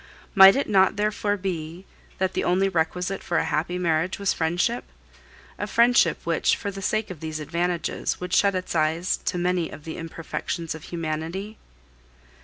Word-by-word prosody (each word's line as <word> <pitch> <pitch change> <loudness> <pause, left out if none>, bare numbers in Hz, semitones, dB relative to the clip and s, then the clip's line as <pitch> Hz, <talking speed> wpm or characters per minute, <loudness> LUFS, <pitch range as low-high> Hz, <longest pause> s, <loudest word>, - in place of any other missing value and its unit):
Might 195 -1 +9
it 275 - 0
not 190 -3 +4
therefore 210 0 0
be 175 -1 -5 0.3
that 190 0 0
the - - -1
only 185 +2 +2
requisite 180 +2 -1
for 170 - -1
a - - +1
happy 165 +4 -1
marriage 170 0 0
was 200 -1 +1
friendship 165 +2 0 0.8
a 205 - -2
friendship 240 +3 +4
which, - - +2
for 200 - -4
the 195 0 -8
sake 215 +1 -1
of 175 - -8
these 155 0 -5
advantages, 170 +2 -2
would 180 0 -5
shut 200 0 +4
its 185 0 -3
eyes 160 +2 +1
to - - -1
many 175 -1 0
of 150 - -11
the 160 - -6
imperfections 165 0 -4
of 160 -1 -10
humanity? 170 +6 -4
180 Hz, 170 wpm, -25 LUFS, 165-195 Hz, 0.8 s, Might